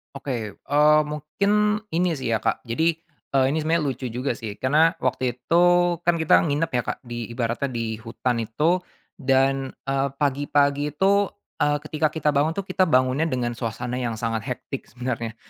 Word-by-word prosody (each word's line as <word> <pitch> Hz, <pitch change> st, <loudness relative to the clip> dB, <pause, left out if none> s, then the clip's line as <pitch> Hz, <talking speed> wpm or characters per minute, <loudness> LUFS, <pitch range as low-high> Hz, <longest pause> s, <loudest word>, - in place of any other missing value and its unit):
Oke, 140 Hz, 0 st, -5 dB, 0.2 s
eee, 150 Hz, +2 st, +4 dB
mungkin 150 Hz, +7 st, -1 dB, 0.4 s
ini 170 Hz, 0 st, +1 dB
sih 130 Hz, -4 st, -3 dB
ya 110 Hz, -, +2 dB
Kak -, -, -1 dB
jadi, 160 Hz, +8 st, +1 dB, 0.4 s
eee, 130 Hz, -1 st, +5 dB
ini 160 Hz, -, 0 dB
sebenarnya 160 Hz, +1 st, +1 dB
lucu 130 Hz, -2 st, -3 dB
juga 125 Hz, +4 st, -2 dB
sih 110 Hz, -3 st, -6 dB
karena 155 Hz, +7 st, +3 dB
waktu 125 Hz, -1 st, 0 dB
itu 165 Hz, +7 st, +1 dB, 0.5 s
kan 170 Hz, -, +5 dB
kita 160 Hz, -2 st, +4 dB
nginep 145 Hz, +3 st, 0 dB
ya 125 Hz, -1 st, +1 dB
Kak -, -, -2 dB
di 120 Hz, -2 st, -5 dB
ibaratnya 120 Hz, +3 st, -2 dB
di 115 Hz, -3 st, -3 dB
hutan 115 Hz, +1 st, -2 dB
itu, 150 Hz, +11 st, +1 dB, 0.4 s
dan, 135 Hz, 0 st, +1 dB
eee, 135 Hz, 0 st, 0 dB
pagi-pagi 145 Hz, +1 st, +1 dB
itu, 200 Hz, +3 st, +3 dB, 0.3 s
eee, 145 Hz, 0 st, +2 dB
ketika 155 Hz, 0 st, 0 dB
kita 155 Hz, -1 st, 0 dB
bangun 150 Hz, +3 st, +1 dB
tuh 200 Hz, -, -2 dB
kita 185 Hz, -1 st, +1 dB
bangunnya 130 Hz, +3 st, +2 dB
dengan 125 Hz, -4 st, -1 dB
suasana 120 Hz, +1 st, -4 dB
yang 120 Hz, -3 st, -2 dB
sangat 115 Hz, -1 st, -3 dB
hectic 130 Hz, +1 st, -5 dB
sebenarnya, 120 Hz, -2 st, -4 dB
135 Hz, 170 wpm, -24 LUFS, 120-155 Hz, 0.5 s, eee